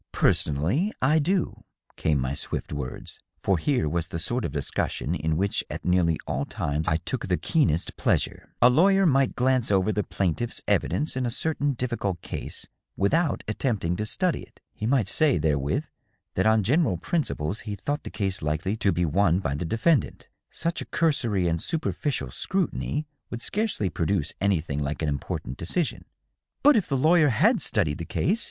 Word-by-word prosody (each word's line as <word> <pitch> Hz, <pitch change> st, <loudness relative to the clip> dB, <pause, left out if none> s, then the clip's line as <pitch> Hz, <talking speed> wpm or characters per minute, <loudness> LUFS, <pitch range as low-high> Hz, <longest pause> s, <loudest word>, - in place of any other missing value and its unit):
" -, -, -61 dB
Personally 90 Hz, -, +2 dB
I 150 Hz, +5 st, +3 dB
do," 180 Hz, +4 st, 0 dB, 0.3 s
came 75 Hz, -3 st, +1 dB
my 65 Hz, +1 st, -1 dB
swift 70 Hz, -, -4 dB
words, 65 Hz, -3 st, -6 dB, 0.2 s
for 95 Hz, -4 st, +2 dB
here 130 Hz, -, +1 dB
was 80 Hz, +1 st, -1 dB
the 90 Hz, -, -5 dB
sort 120 Hz, +8 st, -1 dB
of -, -, -3 dB
discussion 70 Hz, -1 st, -2 dB
in 80 Hz, +1 st, -1 dB
which 100 Hz, +3 st, 0 dB
at -, -, -6 dB
nearly 90 Hz, -3 st, +3 dB
all 70 Hz, -, -1 dB
times 75 Hz, +2 st, -2 dB
I 80 Hz, -, +3 dB
took 95 Hz, +7 st, -4 dB
the 90 Hz, -2 st, +1 dB
keenest 130 Hz, -, +1 dB
pleasure. -, -, -1 dB
" -, -, -46 dB
A 120 Hz, -, +9 dB
lawyer 195 Hz, +7 st, +5 dB
might 135 Hz, -5 st, +3 dB
glance 130 Hz, -1 st, +2 dB
over 100 Hz, +1 st, +3 dB
the 105 Hz, -, 0 dB
plaintiff's 100 Hz, +5 st, -1 dB
evidence 150 Hz, -, 0 dB
in 130 Hz, -1 st, 0 dB
a -, -, 0 dB
certain 145 Hz, +3 st, -1 dB
difficult 120 Hz, -7 st, -2 dB
case, -, -, -5 dB, 0.3 s
without 155 Hz, -, +1 dB
attempting 105 Hz, -6 st, -1 dB
to 105 Hz, -, -2 dB
study 180 Hz, -, 0 dB
it. -, -, -16 dB
He 110 Hz, -, -3 dB
might 125 Hz, -5 st, +2 dB
say, 150 Hz, +4 st, +3 dB
therewith, 75 Hz, -2 st, 0 dB, 0.5 s
that -, -, +1 dB
on 110 Hz, -1 st, +4 dB
general 130 Hz, -, +2 dB
principles 100 Hz, -, -2 dB
he 105 Hz, -2 st, -5 dB
thought 145 Hz, +9 st, -3 dB
the -, -, -7 dB
case 100 Hz, -2 st, -2 dB
likely 75 Hz, +7 st, -1 dB
to 100 Hz, -, +2 dB
be 90 Hz, 0 st, +1 dB
won 85 Hz, +2 st, +3 dB
by 80 Hz, -8 st, -1 dB
the 75 Hz, +5 st, -3 dB
defendant. 115 Hz, -, +1 dB, 0.2 s
Such 170 Hz, +1 st, -3 dB
a -, -, -5 dB
cursory 120 Hz, -, +1 dB
and 85 Hz, -1 st, 0 dB
superficial 145 Hz, -, -2 dB
scrutiny 170 Hz, -, -2 dB, 0.2 s
would 120 Hz, 0 st, -5 dB
scarcely 210 Hz, -, 0 dB
produce 85 Hz, -2 st, 0 dB
anything 85 Hz, -7 st, 0 dB
like 75 Hz, +2 st, -3 dB
an 75 Hz, -, +1 dB
important 70 Hz, -2 st, -4 dB
decision." 155 Hz, -, -1 dB, 0.3 s
" -, -, -55 dB
But 290 Hz, 0 st, +7 dB
if 205 Hz, -, +2 dB
the 135 Hz, -, 0 dB
lawyer 155 Hz, +2 st, +5 dB
had 115 Hz, -, +3 dB
studied 75 Hz, 0 st, +1 dB
the 85 Hz, -, -4 dB
case 205 Hz, -, 0 dB
100 Hz, 185 wpm, -26 LUFS, -, 0.5 s, A